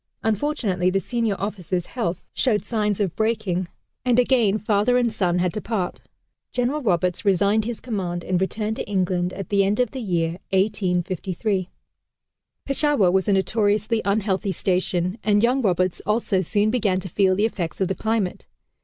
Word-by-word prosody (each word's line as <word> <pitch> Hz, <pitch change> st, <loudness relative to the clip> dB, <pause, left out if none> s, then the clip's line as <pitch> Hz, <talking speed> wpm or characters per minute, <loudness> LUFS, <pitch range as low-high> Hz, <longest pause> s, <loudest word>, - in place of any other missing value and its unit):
Unfortunately 215 Hz, -5 st, 0 dB
the 195 Hz, +1 st, +1 dB
senior 230 Hz, -1 st, -1 dB
officer's 185 Hz, -3 st, -3 dB
health 200 Hz, -8 st, -3 dB
showed 215 Hz, -6 st, +1 dB
signs 210 Hz, -2 st, 0 dB
of 195 Hz, -5 st, -1 dB
breaking 215 Hz, -5 st, 0 dB, 0.4 s
and 245 Hz, -1 st, +2 dB
again 240 Hz, -5 st, +3 dB
father 215 Hz, +3 st, +2 dB
and 240 Hz, -3 st, +1 dB
son 180 Hz, -4 st, +1 dB
had 180 Hz, -1 st, 0 dB
to 215 Hz, -, -3 dB
part. 200 Hz, -5 st, -3 dB, 0.5 s
General 255 Hz, +5 st, 0 dB
Roberts 180 Hz, -, 0 dB
resigned 200 Hz, +2 st, +3 dB
his 235 Hz, -1 st, -4 dB
command 180 Hz, -7 st, -3 dB
and 185 Hz, -1 st, 0 dB
returned 215 Hz, +3 st, -2 dB
to -, -, -5 dB
England, 180 Hz, -2 st, 0 dB
at 190 Hz, -1 st, -7 dB
the 200 Hz, -1 st, +3 dB
end 200 Hz, +3 st, 0 dB
of 245 Hz, -3 st, +2 dB
the 260 Hz, -, -5 dB
year 170 Hz, -4 st, -1 dB
1853. 185 Hz, -1 st, 0 dB, 1.0 s
Peshawar 275 Hz, -, +2 dB
was 190 Hz, 0 st, +1 dB
a 205 Hz, -, +3 dB
notoriously 210 Hz, +3 st, +1 dB
unhealthy 200 Hz, -1 st, 0 dB
station, 185 Hz, +1 st, -1 dB
and 205 Hz, 0 st, +3 dB
young 250 Hz, +3 st, +3 dB
Roberts 185 Hz, -4 st, +1 dB
also 210 Hz, -3 st, +1 dB
soon 205 Hz, +4 st, +1 dB
began 205 Hz, -6 st, +1 dB
to 190 Hz, -, -5 dB
feel 185 Hz, +1 st, +2 dB
the 205 Hz, +3 st, +2 dB
effects 180 Hz, -7 st, -3 dB
of 190 Hz, -, +1 dB
the 190 Hz, -, -1 dB
climate. 220 Hz, -3 st, -2 dB
200 Hz, 165 wpm, -23 LUFS, 185-220 Hz, 1.0 s, again